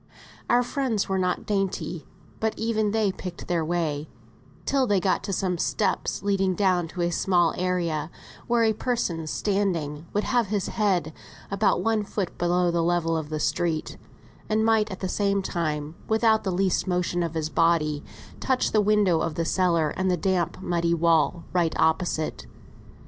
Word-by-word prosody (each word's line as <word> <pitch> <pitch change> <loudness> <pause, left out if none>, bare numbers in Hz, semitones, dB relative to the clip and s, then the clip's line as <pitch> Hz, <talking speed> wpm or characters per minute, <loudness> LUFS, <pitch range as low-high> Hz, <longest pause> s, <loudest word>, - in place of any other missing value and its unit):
Our 245 +1 +4
friends 245 -5 -1
were 190 0 0
not 180 -1 -1
dainty, 195 -5 -2 0.3
but 220 0 -1
even 220 -2 0
they 215 -2 +1
picked 180 -2 -8
their 170 -2 0
way 155 -3 -2 0.6
till 270 -2 +2
they 205 -2 +3
got 185 +1 0
to 200 - -3
some 180 -2 -1
steps 205 - -1
leading 195 -2 +1
down 185 -3 +2
into 175 +2 -4
a 170 - +1
small 175 -1 +2
area, 170 -4 -1 0.4
where 235 -1 +3
a 220 -1 +3
person 200 -9 -2
standing 170 -6 -1
would 210 - 0
have 240 -4 +1
his 200 -1 -1
head 185 -7 0 0.4
about 200 0 +2
one 225 -1 +2
foot 200 -2 -3
below 175 0 +2
the 170 0 +1
level 165 -1 +1
of 160 -2 -3
the 155 -1 -3
street, 155 +1 -1 0.5
and 220 +1 +2
might 220 -1 +3
at 190 - -7
the 190 - -1
same 200 +1 0
time, 155 -4 -2
without 220 0 +3
the 190 - -1
least 190 +1 +1
motion 180 -1 0
of 165 -1 -2
his 155 -1 -1
body, 155 -3 +2 0.4
touch 260 -1 +1
the 215 - +4
window 205 -5 +3
of 160 - -2
the 165 - -1
cellar 170 -4 +2
and 190 0 -1
the 180 - +2
damp 180 -1 0
muddy 170 -1 +1
wall 165 0 +2
right 170 -3 +1
opposite. 160 - 0
180 Hz, 170 wpm, -25 LUFS, 165-205 Hz, 0.6 s, Our